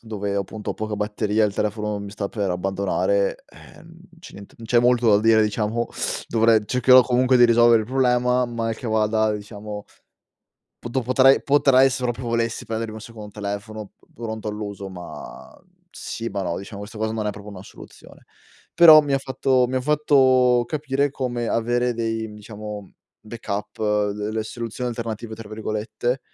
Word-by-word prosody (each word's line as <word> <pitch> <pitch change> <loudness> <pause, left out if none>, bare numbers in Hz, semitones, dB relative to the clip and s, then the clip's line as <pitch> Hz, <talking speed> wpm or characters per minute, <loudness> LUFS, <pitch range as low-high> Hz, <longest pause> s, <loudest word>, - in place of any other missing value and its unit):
dove, 105 -2 -4
appunto, 100 +2 -4
ho - - -4
poca 110 -1 -4
batteria, 105 +1 0
il 100 -1 -1
telefono 105 0 -2
mi 100 0 -7
sta 100 -1 -4
per 100 -4 -2
abbandonare, - - -1
ehm, 165 0 -16 0.2
c'è - - -13
niente 100 - -13
non 115 - -10
c'è 120 +1 +3
molto 120 -1 +3
da 100 -1 +5
dire, 110 0 +4
diciamo, 110 +2 -1 0.4
dovrei 115 -1 +4
cercherò, 125 +1 +6
comunque 125 +1 +2
di 120 - +7
risolvere 120 -1 +5
il 110 - -9
problema, 125 -1 +2
mal 115 -1 -3
che 125 - -8
vada 110 0 +1
diciamo 105 0 -7 1.0
poto 120 +2 -2
potrei 130 +2 +4
potrei, 135 -2 +4
se 125 0 -3
proprio 120 0 -2
volessi 115 -1 -2
prendermi 110 -1 -4
un 110 - -8
secondo 110 -2 -10
telefono, 105 +1 -6
p - - -27
pronto 110 -2 -6
all'uso, 105 -2 -5
ma, 90 -2 -10
uhm, - - -33 0.2
sì, 115 0 -6
ma 100 -2 -4
no, 85 -2 -2
diciamo 100 +1 -8
questa 105 +1 -9
cosa 110 0 -1
non 110 -1 -3
è - - 0
proprio 105 0 -11
una 95 -2 -9
soluzione. - - -15 0.5
Però 160 -3 +9
mi 145 -2 -3
ha 135 - +3
fatto 130 -1 +1
mi 130 - -5
ha 130 - +1
fatto 130 -4 +3
capire 140 -1 -1
come 120 -4 -3
avere 120 +1 0
dei, 115 -1 -3
diciamo, 105 0 -8
mhmm 95 - -19 0.3
backup, 105 -2 -6 0.3
delle 105 +2 -3
"soluzioni 120 +2 -5
alternative", 115 -1 -5
tra 110 -1 -11
virgolette, 110 +3 -3
115 Hz, 175 wpm, -22 LUFS, 105-125 Hz, 1.0 s, Però